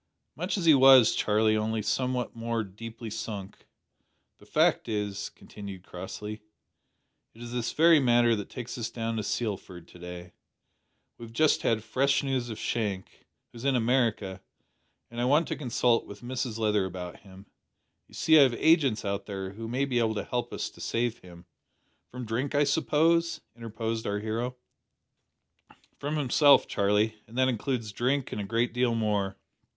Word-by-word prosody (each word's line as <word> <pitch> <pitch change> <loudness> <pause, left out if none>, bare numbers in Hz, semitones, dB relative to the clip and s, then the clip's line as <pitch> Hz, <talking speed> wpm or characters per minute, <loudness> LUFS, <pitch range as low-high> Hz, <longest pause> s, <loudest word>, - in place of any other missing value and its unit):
"Much 180 +8 -2
as 180 - -2
he 160 - +8
was, 130 -4 +7
Charlie, 110 +1 +2
only 110 0 -1
somewhat 125 +2 -1
more 115 0 -2
deeply 110 +3 -9
sunk. 100 -3 -7 0.7
The - - -18
fact - - +2
is," 105 -2 -3
continued 100 -3 -10
Crossley, 105 +4 -7 0.9
"it 115 - -14
is 120 - -8
this 120 -1 -2
very 165 0 +6
matter 120 -3 +4
that 105 -2 -6
takes 125 0 -7
us 115 - -3
down 115 -1 -3
to - - 0
Sealford 100 -5 -4
to 90 - -15
day. 90 0 -9 0.9
We 120 - -8
have 115 - -13
just 155 +5 +3
had 110 -2 +1
fresh 140 +4 +1
news 130 -3 -1
of 110 - -6
Shank 105 -5 -4 0.2
who - - -13
is 115 - -9
in 135 -1 +2
America 115 -6 0 0.7
and 120 0 -4
I - - +1
want 150 +5 +3
to - - -1
consult 120 -3 +1
with 100 0 -11
Mrs 125 -2 -3
Leather 105 -3 +1
about 90 -1 -7
him. 95 -1 -15 0.6
You - - -16
see 160 -1 +5
I - - +9
have 130 -4 +4
agents 145 -9 +3
out 100 0 -3
there 95 -2 -5
who 115 +3 -7
may 130 +4 0
be 125 -3 0
able 110 -1 +1
to - - -2
help 120 -1 -3
us - - -4
to - - -14
save 120 0 -1
him." 85 -1 -14 0.6
"From 125 0 -7
drink, 125 +6 -2
I 145 - +4
suppose," 165 +3 +2
interposed 115 -1 -4
our 100 - -1
hero. 115 +4 -3 1.4
"From 145 +2 -3
himself, 145 0 +5
Charlie, 105 +1 +1
and 115 +3 -11
that 130 0 +3
includes 115 -2 -2
drink 130 +5 -1
and 105 - -3
a - - -4
great 115 +3 0
deal 125 -1 +1
more. 105 -3 -1
115 Hz, 175 wpm, -28 LUFS, 105-130 Hz, 1.4 s, I